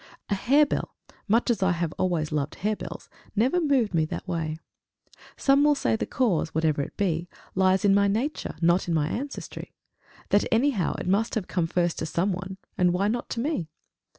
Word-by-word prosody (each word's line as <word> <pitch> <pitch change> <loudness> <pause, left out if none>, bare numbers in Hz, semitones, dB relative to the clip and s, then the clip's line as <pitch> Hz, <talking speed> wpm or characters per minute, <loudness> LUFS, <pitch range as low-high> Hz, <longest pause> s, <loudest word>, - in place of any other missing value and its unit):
A - - +1
harebell, 280 +9 +2 0.3
much 230 +4 +3
as 215 -4 -1
I 190 -2 +3
have 170 -2 -2
always 170 -5 0
loved 150 -2 -2
harebells, 210 +2 -4 0.3
never 255 - +2
moved 265 - +2
me 160 -2 +3
that 155 - -6
way! 160 -3 -2 0.8
Some 275 +1 +4
will 295 0 +5
say 275 - +1
the - - -3
cause, 180 -11 0
whatever 160 -2 +2
it - - -7
be, 175 -3 -1 0.2
lies 190 +2 +3
in 200 - +5
my 200 0 +4
nature, 235 +10 -2
not 175 +2 +3
in 170 - +1
my 150 -2 +1
ancestry; 275 +8 -6 0.5
that, 205 +1 +4
anyhow, 230 - +2
it - - -5
must 205 +6 +1
have 210 -5 -2
come 175 -3 0
first 175 0 0
to 160 - -2
some 175 +5 0
one 190 +1 -6 0.2
and 180 -1 +4
why 195 +3 +1
not 240 +2 -2
to 230 - -3
me? 250 - -2
190 Hz, 190 wpm, -26 LUFS, 170-230 Hz, 0.8 s, will